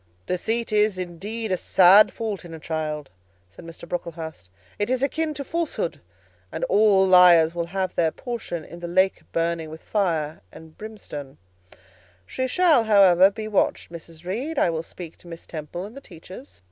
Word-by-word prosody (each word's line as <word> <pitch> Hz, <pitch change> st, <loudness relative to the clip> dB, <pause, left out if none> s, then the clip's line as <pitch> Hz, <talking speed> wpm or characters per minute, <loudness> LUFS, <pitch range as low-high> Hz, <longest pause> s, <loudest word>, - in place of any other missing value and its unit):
"Deceit 225 Hz, +6 st, -2 dB
is, 210 Hz, -2 st, +2 dB
indeed, 195 Hz, +5 st, -5 dB
a 185 Hz, -, +1 dB
sad 190 Hz, +4 st, +6 dB
fault 215 Hz, -5 st, -5 dB
in 165 Hz, -2 st, -9 dB
a -, -, -10 dB
child," 155 Hz, -2 st, -4 dB, 0.4 s
said 100 Hz, -, -14 dB
Mr. 165 Hz, 0 st, -11 dB
Brocklehurst; 160 Hz, -, -6 dB, 0.3 s
"it 205 Hz, -, -1 dB
is 255 Hz, +1 st, 0 dB
akin 315 Hz, +3 st, -1 dB
to 280 Hz, -, -5 dB
falsehood, 310 Hz, -, -3 dB, 0.5 s
and -, -, -5 dB
all 200 Hz, -1 st, +4 dB
liars 175 Hz, -3 st, +6 dB
will 170 Hz, -1 st, -3 dB
have 185 Hz, 0 st, -3 dB
their 165 Hz, -2 st, +2 dB
portion 175 Hz, -, -6 dB
in 170 Hz, -, -11 dB
the 175 Hz, -, -6 dB
lake 185 Hz, +2 st, +1 dB
burning 165 Hz, -1 st, -1 dB
with 160 Hz, +1 st, -10 dB
fire 165 Hz, -7 st, -1 dB
and 160 Hz, -1 st, -14 dB
brimstone; 170 Hz, -11 st, -9 dB, 0.9 s
she 260 Hz, -, -3 dB
shall, 310 Hz, -5 st, +3 dB
however, 195 Hz, -3 st, +6 dB
be 215 Hz, +2 st, -7 dB
watched, 205 Hz, -4 st, 0 dB
Mrs. 165 Hz, 0 st, -11 dB
Reed. 255 Hz, -, -4 dB
I 170 Hz, -, +3 dB
will 160 Hz, -1 st, -2 dB
speak 165 Hz, 0 st, -11 dB
to -, -, -17 dB
Miss 165 Hz, -1 st, -10 dB
Temple 165 Hz, +3 st, -7 dB
and 215 Hz, +4 st, -11 dB
the 275 Hz, -, -9 dB
teachers." 185 Hz, -, -13 dB
180 Hz, 170 wpm, -24 LUFS, 165-215 Hz, 0.9 s, sad